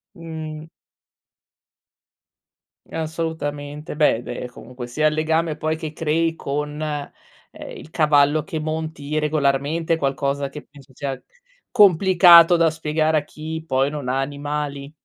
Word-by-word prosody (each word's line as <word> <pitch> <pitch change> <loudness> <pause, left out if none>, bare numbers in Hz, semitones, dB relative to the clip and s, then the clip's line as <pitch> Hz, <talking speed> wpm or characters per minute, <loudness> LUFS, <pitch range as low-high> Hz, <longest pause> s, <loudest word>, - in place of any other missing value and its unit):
Mh. 160 -1 -7 2.2
Assolutamente. 155 -2 -4
Beh, 150 -6 +3
beh, 120 0 -5
comunque 125 0 -9
sia 155 +5 +1
il 150 - +1
legame 160 0 0
poi 155 0 -1
che 160 -1 -5
crei 165 +1 0
con, 150 +1 -4
ehm, 150 -2 -3 0.7
il - - -12
cavallo 150 -1 +3
che 160 0 -4
monti 155 -1 -3
regolarmente 150 +2 0
è - - +1
qualcosa 140 0 -1
che 150 - -9
penso 140 -1 -18
sia 135 -2 -4 0.5
complicato 180 -4 +7
da 165 -1 +4
spiegare 155 0 0
a 145 - 0
chi 160 +2 -7
poi 135 +1 +2
non 145 -4 -5
ha 135 +1 0
animali. 145 0 -4
155 Hz, 130 wpm, -22 LUFS, 145-160 Hz, 2.2 s, complicato